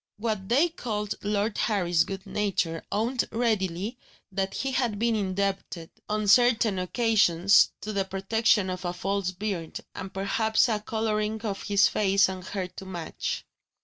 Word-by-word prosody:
What 215 -3 -3
they 285 +9 +4
called 210 -9 -3
Lord 205 +1 -1
Harry's 175 -6 +2
good 195 -1 -6
nature 180 -5 -1
owned 235 +4 0
readily 215 -1 -1 0.3
that 195 0 -2
he 270 - -2
had 240 -5 0
been 230 +1 +1
indebted, 195 -4 -2 0.2
on 215 0 -1
certain 225 -3 +4
occasions, 200 -2 +4
to 215 - -5
the 200 -1 +1
protection 195 +1 +1
of 185 0 -5
a 175 -1 -2
false 195 +1 -1
beard, 185 -3 -4
And 190 - -7
perhaps 220 +4 +2
a 215 -2 +1
colouring 215 0 -1
of 200 -3 -3
his 200 -1 +3
face 200 -1 +3
and 185 -1 -6
hair 185 0 -4
to 195 - -7
match. 175 -4 -4
205 Hz, 150 wpm, -27 LUFS, 190-220 Hz, 0.3 s, they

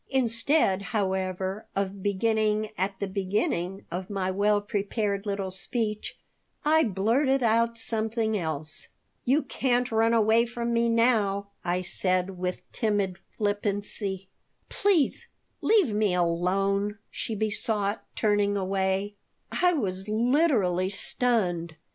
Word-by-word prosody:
Instead, 240 -4 +2 0.2
however, 190 0 -2
of 195 0 -2
beginning 215 +1 +1
at 190 +1 -2
the 200 - -1
beginning 195 -1 -2
of 185 +1 -4
my 190 -2 -1
well 205 +2 +2
prepared 205 0 -2
little 200 -2 -2
speech, 215 +2 -3 0.5
I 315 +1 +5
blurted 245 +7 +2
out 230 +1 +2
something 220 -1 -1
else 155 -5 -3 0.4
"You 280 +5 +3
can't 250 -1 0
run 225 +1 +3
away 225 +1 +4
from 235 0 -3
me 235 0 +2
now," 215 -4 +2
I 180 +1 -1
said, 185 0 -1
with 180 0 -3
timid 200 -5 -1 0.2
flippancy 205 -2 -1 0.4
"Please, 380 -9 +1 0.3
leave 395 - +3
me 205 -3 +2
alone," 195 +4 +1
she 225 - -3
besought, 210 0 -1
turning 205 -2 +2
away 190 +1 0 0.4
I 360 0 +3
was 195 - -2
literally 220 - +2
stunned. 185 -6 0
205 Hz, 115 wpm, -27 LUFS, 190-230 Hz, 0.5 s, I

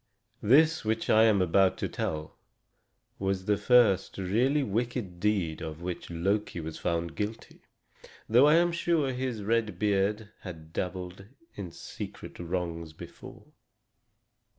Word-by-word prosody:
This 155 +8 +4
which 110 +1 0
I 110 +1 +6
am 105 -4 +4
about 95 +2 +3
to - - -2
tell 75 -1 -4 0.8
was 95 -1 -1
the 105 0 +3
first 120 -4 +3
really 120 +10 +1
wicked 115 -5 -2
deed 95 -6 0
of 80 +1 -6
which 90 -1 -5
Loki 95 +3 -1
was 80 -1 -6
found 85 -1 -2
guilty, 105 +2 -5 0.7
though 125 +6 +6
I 150 - +6
am 175 +1 +4
sure 170 -5 +1
his 125 -4 -3
red 110 -3 0
beard 105 +2 0
had 80 -4 -10
dabbled 90 +1 -5 0.3
in 95 -4 -6
secret - - -9
wrongs 85 -2 -4
before. - - -12
100 Hz, 130 wpm, -29 LUFS, 90-115 Hz, 0.8 s, I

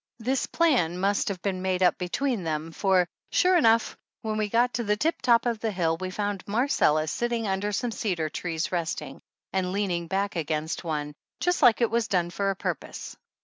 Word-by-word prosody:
This 255 +3 -1
plan 250 - +2
must 200 +2 +1
have 190 -3 -3
been 190 -2 -1
made 185 0 0
up 180 - +4
between 220 +4 -1
them, 160 0 -3
for, 185 0 +2 0.2
sure 365 0 +4
enough, 230 -8 +4 0.3
when 215 -1 -2
we 215 -1 -1
got 240 +3 +2
to 235 - -1
the 210 -1 +1
tip 320 +9 0
top 235 -1 +4
of 235 -2 0
the 225 - -1
hill 170 -5 0
we 185 +1 -4
found 205 0 -3
Marcella 205 - +2
sit 240 +10 -1
ting 230 -2 -1
under 195 +2 -1
some 235 +4 -1
cedar 180 -8 -1
trees 165 +1 -3
resting, 160 -5 -3 0.3
and 185 -1 0
leaning 185 -4 -1
back 195 +2 -1
against 155 0 -2
one, 150 -3 -3 0.3
just 355 0 +1
like 240 -1 +6
it 235 - +2
was 235 -1 +1
done 175 -2 0
for 195 +3 -1
a 195 - 0
pur - - -1
pose. - - -9
195 Hz, 205 wpm, -27 LUFS, 175-230 Hz, 0.3 s, like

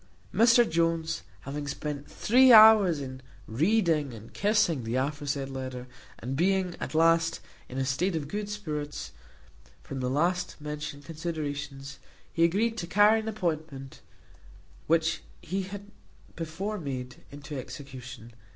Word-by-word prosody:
Mr 235 +1 +5
Jones 165 0 0 0.2
having 145 +1 -5
spent 145 0 -5
three 255 +3 +5
hours 215 -7 +8
in 130 -1 -7 0.2
reading 155 - +1
and 110 +1 -13
kissing 205 - +2
the 115 +2 -3
aforesaid 140 +1 -2
letter, 130 -2 -6 0.3
and 130 +3 -4
being, 185 +2 +1
at - - -5
last, 165 +1 +3 0.3
in 130 - -7
a 135 - 0
state 165 +8 0
of 150 -3 -3
good 205 +6 -4
spirits, 150 -8 -5 0.7
from 135 - -6
the 125 -1 -1
last 175 +6 0
mentioned 150 -1 -6
considerations, 145 -4 -5 0.3
he 165 - +2
agreed 220 +7 +2
to 170 - -4
carry 210 +4 +5
an 220 - -6
appointment, 155 -10 -4 0.9
which 165 0 +2 0.2
he 195 +1 -3
had 200 +2 -8 0.4
before 185 +6 -4
made, 130 -5 -5
into 145 +1 -9
execution. 130 -3 -9
155 Hz, 135 wpm, -28 LUFS, 140-185 Hz, 0.9 s, hours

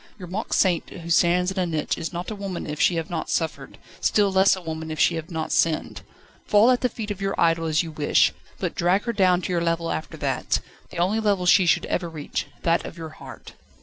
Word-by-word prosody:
Your 185 -4 -9
mock 195 +6 -5
saint 180 -4 +2
who 170 -1 -8
stands 180 +2 +3
in 190 - -3
a 185 - +1
niche 155 -3 -1
is 160 - -5
not 175 +4 -5
a - - -4
woman 195 -3 -5
if 150 0 -4
she 175 - +4
have 165 0 -3
not 165 -2 -3
suffered, 155 -4 -3 0.2
still 205 -2 +2
less 190 +1 +5
a 185 - -8
woman 160 -1 -5
if 155 - -5
she - - +4
have 160 -1 -5
not 160 -2 -4
sinned. 160 -2 0 0.5
Fall 210 +4 +5
at 250 - +1
the 250 - +2
feet 220 -2 -5
of 195 -1 -6
your 195 0 -2
idol 165 0 +2
an 155 - -2
you 165 0 +1
wish, 150 -1 +2 0.2
but - - -3
drag 180 +4 +1
her 235 - -2
down 185 -3 +3
to - - -3
your 170 - +1
level 165 0 0
after 80 - -5
that - - -1 0.3
the - - -10
only 185 +6 +1
level 200 -4 +1
she 180 0 +5
should - - +3
ever 175 -1 -2
reach, 155 -3 -4 0.2
that 170 0 +2
of 170 - -9
your 165 -1 -6
heart." 155 - -12
175 Hz, 245 wpm, -24 LUFS, 165-195 Hz, 0.5 s, less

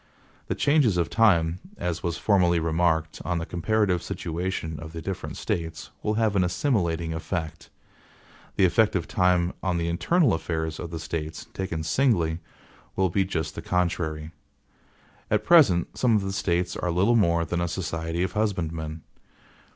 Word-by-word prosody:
The - - -1
changes 140 - +3
of 85 -1 0
time, 85 -7 +3 0.2
as 85 -2 -3
was 85 -2 -2
formerly 90 -5 +3
remarked, 80 -1 0
on 90 -1 -1
the 85 - -3
comparative 90 +1 +1
situation 85 -2 -4
of 80 +1 -9
the 80 - -6
different 95 +1 -5
States, 80 -1 -4
will 105 - 0
have 110 -2 +1
an 95 - +3
assimilating 85 - 0
effect. 80 -1 -4 0.9
The 95 - +4
effect 105 +4 +3
of 85 -3 -1
time 90 -1 +2
on 95 -2 0
the 85 0 -1
internal 130 - +2
affairs 80 -1 -3
of 85 - -5
the 85 - -5
States, 80 -1 -5
taken 85 -4 -3
singly, 85 - +1 0.6
will 95 -2 +1
be 95 +2 +2
just 80 -4 -3
the - - -6
contrary. 80 -3 -1 1.0
At 105 0 +1
present 120 - +5
some 120 -3 +3
of 105 - +1
the 95 0 -3
States 90 -2 0
are 90 - -2
little 95 +8 +3
more 85 -6 +3
than 85 +2 -2
a 85 - 0
society 80 0 -2
of 95 - -1
husbandmen. 80 -7 -2
85 Hz, 160 wpm, -26 LUFS, 80-95 Hz, 1.0 s, present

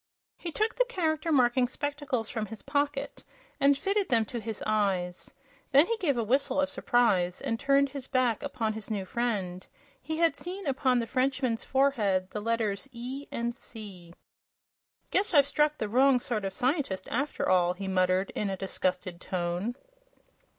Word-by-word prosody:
He 340 - -6
took 435 +6 0
the - - +2
Character 325 -8 -1
Marking 250 -2 +4
spectacles 285 -4 -3
from 220 -2 -3
his 220 +1 -9
pocket 285 0 -2 0.4
and 280 0 +5
fitted 395 +4 0
them 230 -3 +3
to 235 +3 -5
his 220 -1 -5
eyes. 195 -5 -1 0.4
Then 280 +3 +7
he 460 - 0
gave 305 - +1
a 235 - +1
whistle 270 +5 +1
of 280 0 +2
surprise 200 -10 +2
and 230 -5 -2
turned 275 +1 +3
his 275 -2 -7
back 255 -4 +1
upon 235 -6 -2
his 220 0 -7
new 200 -3 -2
friend. 190 -5 -2 0.3
He 315 +4 -4
had 335 0 +3
seen 375 +3 -5
upon 265 -2 +2
the 235 - 0
Frenchman's 255 -1 0
forehead 215 -9 +1
the 210 - -4
letters 225 +1 -1
"E" 255 +4 -6
and 235 0 -2
"C." 195 -8 -9 1.0
"Guess 390 -2 +1
I've 285 -2 +7
struck 300 +1 +1
the 215 - -2
wrong 255 +4 +4
sort 225 -4 -2
of 195 - -3
scientist, 250 - -1
after 285 +5 -1
all!" 180 -1 +3
he 195 +2 -6
muttered, 185 0 +1
in 210 - -2
a 190 - -3
disgusted 185 -2 -2
tone. 180 +5 -2
240 Hz, 170 wpm, -29 LUFS, 200-280 Hz, 1.0 s, Then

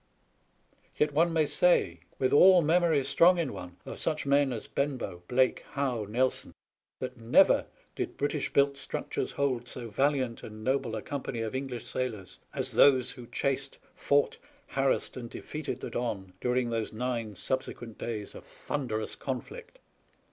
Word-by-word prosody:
Yet 150 -1 +2
one 165 +3 +3
may 160 -2 +3
say, 180 +4 +5 0.2
with 130 - +1
all 180 +3 +7
memory 160 -2 +3
strong 165 +7 +5
in 160 -9 -1
one 90 -2 -9
of - - -7
such 155 -2 -1
men 140 -1 +3
as 115 -3 -5
Eenbow, 130 -11 -3
Blake, 130 +1 +2
Howe, 125 -7 -1
Nelson, 125 +4 0 0.4
that 130 0 -5
never 115 +1 +4 0.3
did - - -4
British 145 0 -1
built 140 0 +4
struc - - -5
tures - - -2
hold 130 -4 -1
so 120 -3 -7
valiant 130 0 0
and 110 0 -9
noble 130 -2 0
a 110 - -5
company 135 -4 -4
of 110 -1 -3
English 130 -3 -4
sailors 110 -8 -4
as - - -1
those 130 -3 +5
who 125 -2 -11
chased, 135 +2 -1 0.2
fought, 145 0 +1 0.3
harassed, 135 -1 0
and 120 -2 -6
defeated 145 -3 -6
the - - -5
Don 100 -6 -3
during 125 -1 0
those 115 -2 -2
nine 115 -2 -3
subsequent 120 +1 -3
days 110 -3 -4
of - - -10
thunderous 115 -7 -4
conflict. 465 - -6
130 Hz, 155 wpm, -29 LUFS, 115-140 Hz, 0.4 s, all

